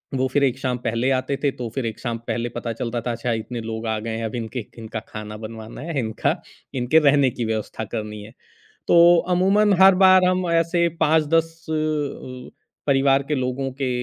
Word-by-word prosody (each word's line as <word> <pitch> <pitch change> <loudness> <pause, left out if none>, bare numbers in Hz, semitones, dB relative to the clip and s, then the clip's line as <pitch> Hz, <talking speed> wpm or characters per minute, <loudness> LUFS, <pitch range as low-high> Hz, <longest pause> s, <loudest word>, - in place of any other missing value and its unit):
वो 130 0 +1
फिर 145 - +3
एक 130 -3 +1
शाम 130 -2 -1
पहले 115 +1 -1
आते 130 +1 0
थे 145 - +4
तो 120 - -3
फिर 135 -3 -2
एक 110 -2 -4
शाम 120 -2 -3
पहले 120 0 -2
पता 115 - -3
चलता 115 +1 -3
था - - 0
अच्छा, 115 +1 -3
इतने 115 +2 -4
लोग 110 0 -5
आ 110 -1 0
गए 110 +1 -4
हैं, 115 - -3
अब 110 - -4
इनके 115 0 -4
इनका 110 -1 -6
खाना 105 0 -6
बनवाना 110 +2 -9
है, 160 -2 -3
इनका 110 -3 -1 0.5
इनके 140 +6 +4
रहने 140 -2 +4
की 120 - 0
व्यवस्था 110 0 -4
करनी 105 -1 -5
है। 110 +2 -13 0.6
तो - - +5 0.4
अमूमन 200 +3 +3
हर 190 0 +8
बार 185 -1 +7
हम 185 0 +1
ऐसे 170 +1 +2
5-10 160 +1 +3 0.2
अ, - - 0 1.1
परिवार 135 -1 +3
के - - +2
लोगों 130 0 -2
के 135 - 0
125 Hz, 195 wpm, -22 LUFS, 115-150 Hz, 1.1 s, हर